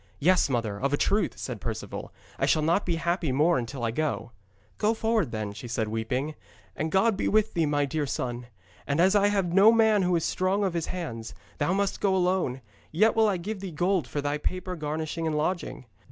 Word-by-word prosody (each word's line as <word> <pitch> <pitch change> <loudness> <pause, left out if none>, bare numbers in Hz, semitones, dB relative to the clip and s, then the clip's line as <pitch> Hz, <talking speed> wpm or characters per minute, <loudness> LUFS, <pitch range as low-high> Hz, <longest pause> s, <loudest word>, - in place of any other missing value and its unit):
'Yes, 180 +1 +3
mother, 115 -5 -1
of 140 +1 0
a - - +3
truth,' 205 +7 +1
said - - -5
Perceval. - - -5 0.3
'I - - +2
shall 155 - +3
not 170 +6 +1
be 170 - +1
happy 170 -2 -1
more 150 +4 +3
until 120 +1 -5
I 115 - 0
go.' 120 -4 -2 0.5
'Go 220 +2 +2
forward, 220 - +1
then,' 110 -2 -4
she 105 +4 -8
said 115 -2 -2
weeping, 125 +7 -2 0.4
'and 160 +1 -2
God 200 +3 +3
be - - -1
with 215 0 +2
thee, 165 -3 +1
my 145 -1 +1
dear 150 0 -2
son. 120 -2 -3 0.4
And 145 +2 0
as 190 +4 +4
I 205 0 +5
have 195 -4 0
no 200 +4 +7
man 220 -2 +4
who 180 -1 +2
is 165 - 0
strong 190 +3 0
of 190 -3 0
his 170 -2 -2
hands, 115 -11 -5 0.2
thou 145 +6 +1
must 200 0 -1
go 195 -2 +2
alone, 180 -8 0 0.3
yet 215 +7 +3
will 220 -1 +4
I 195 - 0
give 200 +4 -5
thee 195 0 -5
gold 175 -2 0
for 145 +4 -3
thy 145 +1 -1
proper 185 +3 -3
garnishing 155 +1 -3
and 155 -1 0
lodging. 165 -3 -2
165 Hz, 215 wpm, -27 LUFS, 140-190 Hz, 0.5 s, no